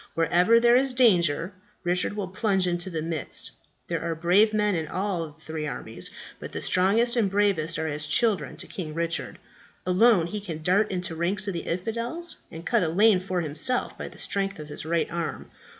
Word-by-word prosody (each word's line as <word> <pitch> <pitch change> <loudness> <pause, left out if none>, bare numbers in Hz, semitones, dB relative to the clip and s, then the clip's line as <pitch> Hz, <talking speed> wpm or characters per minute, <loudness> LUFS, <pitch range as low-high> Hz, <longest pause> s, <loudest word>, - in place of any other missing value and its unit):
Wherever 180 +7 +4
there 240 +1 +5
is 265 +1 +3
danger, 180 - +3 0.3
Richard 180 +3 0
will 205 -2 -3
plunge 190 -1 +1
into 175 +1 -1
the 160 -3 -3
midst. 160 -3 -3 0.4
There - - -2
are 170 -1 -2
brave 180 +7 +4
men 210 -1 +1
in 160 -3 -2
all 185 -3 -2
the 150 - -14
three 155 -1 -5
armies; 115 -5 -4 0.3
but - - -8
the - - -4
strongest 220 +7 +3
and 220 -5 +2
bravest 195 -5 +1
are 160 - -2
as 150 -1 -3
children 185 - +1
to - - -5
King 155 -5 -6
Richard. 170 0 -2 0.5
Alone 185 0 +4
he 205 +5 -4
can 165 -6 -6
dart 200 +5 +3
into 180 -2 -3
ranks 185 +5 0
of 200 - -1
the 170 - -2
infidels, 230 - -4
and 165 +1 -9
cut - - +2
a 165 - +1
lane 200 +3 +5
for 185 -1 -2
himself 160 - 0
by - - -6
the - - -13
strength 195 0 -2
of 150 -1 -9
his 150 - -6
right 170 0 +1
arm. 170 -1 -4
180 Hz, 200 wpm, -26 LUFS, 165-210 Hz, 0.5 s, there